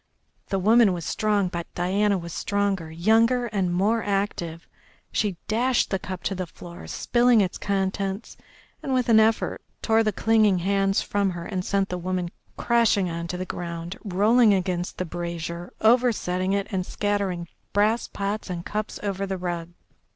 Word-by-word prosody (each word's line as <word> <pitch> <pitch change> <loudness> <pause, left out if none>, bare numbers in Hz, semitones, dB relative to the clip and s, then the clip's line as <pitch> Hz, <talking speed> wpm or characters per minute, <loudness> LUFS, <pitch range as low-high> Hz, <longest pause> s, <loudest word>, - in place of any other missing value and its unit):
The 195 - -1
woman 215 +1 +5
was 170 -3 -5
strong, 210 -3 +1
but 170 -1 -5
Diana 195 +3 +1
was 170 -2 -7
stronger, 200 -5 -1
younger 225 +9 +3
and 195 -6 -1
more 205 +6 +2
active. 195 -5 -2 0.4
She 205 -5 0
dashed 245 +3 +1
the 195 - 0
cup 185 -1 -6
to - - -1
the 185 -1 -4
floor, 170 +1 -11
spilling 240 -1 +3
its 190 -3 0
contents, 195 +1 -2 0.5
and, 265 -2 -1
with 250 -2 +1
an 220 -1 +7
effort, 220 0 +2 0.2
tore 225 0 +4
the 215 -1 +1
clinging 215 -1 +3
hands 195 +2 +1
from 200 -1 0
her 175 -2 -5
and 185 -2 -3
sent 195 0 0
the 180 - -3
woman 180 -1 -2 0.3
crashing 225 -6 +2
on 170 0 -4
to 180 - -4
the 185 - -3
ground, 170 0 -5
rolling 210 +3 +4
against 180 -1 -2
the 185 - -2
brazier, 170 0 -5
oversetting 220 -6 +2
it, 200 0 0
and 190 -2 0
scattering 195 -3 -2 0.2
brass 215 +3 +2
pots 200 +1 -3
and 175 -1 -4
cups 215 0 -4
over 195 -1 -2
the 190 0 -2
rug. 175 -2 -4
195 Hz, 165 wpm, -25 LUFS, 180-215 Hz, 0.5 s, an